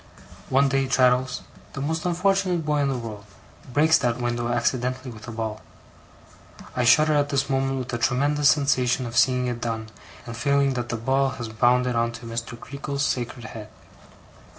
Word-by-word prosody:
One 135 +2 +4
day, 135 0 +1
Traddles 130 -1 +2 0.3
(the - - -6
most 160 +5 -2
unfortunate 180 -1 +1
boy 150 -1 +1
in 140 -1 +1
the 135 - -1
world) 110 -4 -7 0.5
breaks 155 +4 +4
that 120 -3 0
window 120 -1 -1
accidentally, 125 +1 -1
with 110 0 -12
a - - -5
ball. 110 -1 -4 1.1
I 125 - +1
shudder 155 +7 +5
at 145 -1 +2
this 140 -1 0
moment 135 0 0
with 130 -1 -5
the 120 - -3
tremendous 140 +4 +2
sensation 130 -3 +2
of 115 0 -6
seeing 125 0 +3
it 120 -1 -3
done, 110 -2 -3 0.4
and 115 - -7
feeling 140 +3 +2
that 120 -1 -4
the 120 - -2
ball 135 +4 +1
has 115 -1 -5
bounded 125 +3 +2
on 115 0 +1
to 115 0 -10
Mr. 115 0 -5
Creakle's 140 +2 -4
sacred 120 -2 -3
head. 110 -1 -8
125 Hz, 175 wpm, -24 LUFS, 120-140 Hz, 1.1 s, shudder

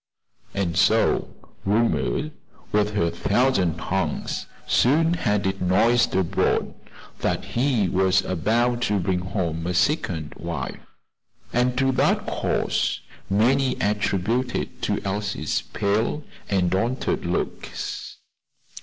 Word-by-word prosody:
And 90 -5 -1
so 110 +3 +3 0.3
"Rumor, 115 +8 +1 0.4
with 105 0 +1
her 85 -4 +2
thousand 95 -1 +1
tongues," - - -2 0.2
soon 160 +6 +3
had 105 - 0
it 95 0 -1
noised 115 +7 +3
abroad 95 -3 +1 0.5
that - - -1
he 120 -5 +1
was 95 +1 +3
about 120 +7 +1
to 105 - +2
bring 90 0 0
home 85 -3 -2
a 90 - -1
second 85 - 0
wife, 80 -5 -5 0.7
and 125 +1 +2
to 135 0 +3
that 130 - +2
cause - - 0 0.3
many 125 +7 +3
attributed 105 +4 0 0.4
Elsie's 100 -5 -1
pale 110 +8 0 0.3
and 95 -3 +1
altered 120 +7 0
looks. - - -4
105 Hz, 105 wpm, -24 LUFS, 90-120 Hz, 0.7 s, so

